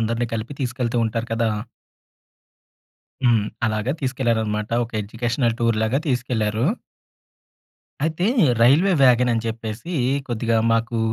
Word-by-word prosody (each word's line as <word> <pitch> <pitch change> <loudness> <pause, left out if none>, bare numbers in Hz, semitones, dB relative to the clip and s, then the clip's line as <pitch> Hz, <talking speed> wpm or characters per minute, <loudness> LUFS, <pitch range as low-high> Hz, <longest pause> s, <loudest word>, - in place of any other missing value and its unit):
అందరినీ 115 +2 0
కలిపి 115 +5 -4
తీసుకెళ్తూ 125 -2 -2
ఉంటారు 115 +1 -2
కదా! 115 0 +1 1.8
హ్మ్. 115 -4 +4 0.2
అలాగా 110 +3 -1
తీసుకెళ్లారన్నమాట. 115 -5 -1 0.2
ఒక 115 - -16
ఎడ్యుకేషనల్ 120 +2 -1
టూర్ 115 -2 +2
లాగా 115 +5 +1
తీసుకెళ్లారు. 120 -3 0 1.4
అయితే 160 +3 0 0.4
రైల్వే 155 +11 +5
వ్యాగన్ 125 -1 +5
అని 115 - -1
జెప్పేసి 115 +7 -5 0.3
కొద్దిగా 115 -1 0
మాకు 115 0 0
115 Hz, 110 wpm, -22 LUFS, 110-125 Hz, 1.8 s, రైల్వే